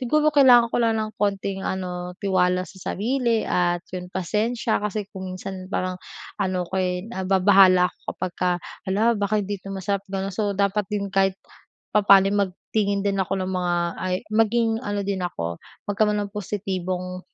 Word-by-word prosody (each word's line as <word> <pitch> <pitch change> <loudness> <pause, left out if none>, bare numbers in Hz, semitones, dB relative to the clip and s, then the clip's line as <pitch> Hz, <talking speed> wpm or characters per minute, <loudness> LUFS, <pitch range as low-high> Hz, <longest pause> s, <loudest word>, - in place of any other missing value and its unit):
siguro 305 +4 +2
kailangan 245 -5 +6
ko - - +1
lang 225 -1 +2
ng 215 0 -3
konting 195 -1 -1
ano, 180 -1 -4
tiwala 185 -2 +1
sa 190 -1 -7
sarili 235 +1 0
at 175 0 0
yun 180 -1 -5
pasensya. 210 +6 -1
Kasi 210 0 -2
kung 190 -1 -6
minsan 185 0 -7
parang 185 -2 -2 0.4
ano 185 -2 0
ko, 190 +2 -2
eh, 180 0 -1
nababahala 190 -3 +5
ako - - -37 0.2
kapagka, 180 0 -1 0.4
"Hala, 220 +5 +3
baka 205 +1 +1
hindi 200 -1 -4
to 195 - -10
masarap". 195 +1 -1
Ganun. 195 0 -3
So 200 0 -1
dapat 200 0 +1
din 200 -2 -3
kahit 195 -1 +2 0.6
papaano 195 -2 +6
ay 205 - -1
magtingin 200 +2 -1
din 195 -1 0
ako 190 - -2
ng 185 +1 -3
mga 180 -1 0 0.3
ay, 185 +1 -1 0.2
maging 225 +1 +2
ano 205 -2 -2
din 195 -2 -1
ako, 85 - -4 0.3
magkaroon 210 +1 +2
ng 200 - -9
positibong, 185 -2 -3
195 Hz, 165 wpm, -24 LUFS, 185-210 Hz, 0.6 s, kailangan